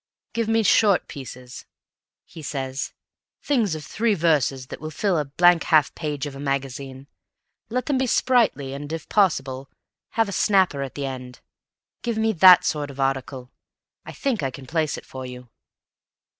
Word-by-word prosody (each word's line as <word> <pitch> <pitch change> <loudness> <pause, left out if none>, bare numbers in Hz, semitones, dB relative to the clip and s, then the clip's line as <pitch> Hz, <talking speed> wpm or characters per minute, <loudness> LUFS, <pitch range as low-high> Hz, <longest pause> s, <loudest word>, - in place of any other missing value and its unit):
"Give 230 -1 -1
me 225 0 +2
short 200 -1 +4
pieces," 130 -3 -10 0.6
he 165 - -12
says; 135 -2 -4 0.5
"things 230 - +1
of 155 - -7
three 220 0 0
verses 150 -6 +1
that - - -8
will 155 - -5
fill 190 +4 0
a 150 - -1
blank 175 +4 +4
half 155 -3 +3
page 150 -3 -4
of 145 -2 -7
a - - -9
magazine. 135 -1 -4 0.6
Let 250 +2 -2
them 280 -3 0
be 265 - +1
sprightly, 225 - +2
and, 145 +2 -7
if 165 -1 -5
possible, 135 -9 +1 0.5
have 225 -1 +3
a - - -5
snapper 190 -8 +2
at 135 -2 -5
the 140 - -3
end. 130 -2 -7 0.6
Give 235 -2 -2
me 220 0 +1
that 185 0 +8
sort 150 -2 -1
of 140 0 -11
article. 135 -1 -2 0.5
I - - -9
think 260 - -2
I 135 - -1
can 130 +1 -10
place 155 +1 -1
it - - -10
for 130 0 -8
you." 125 -1 -9
150 Hz, 170 wpm, -23 LUFS, 135-200 Hz, 0.6 s, that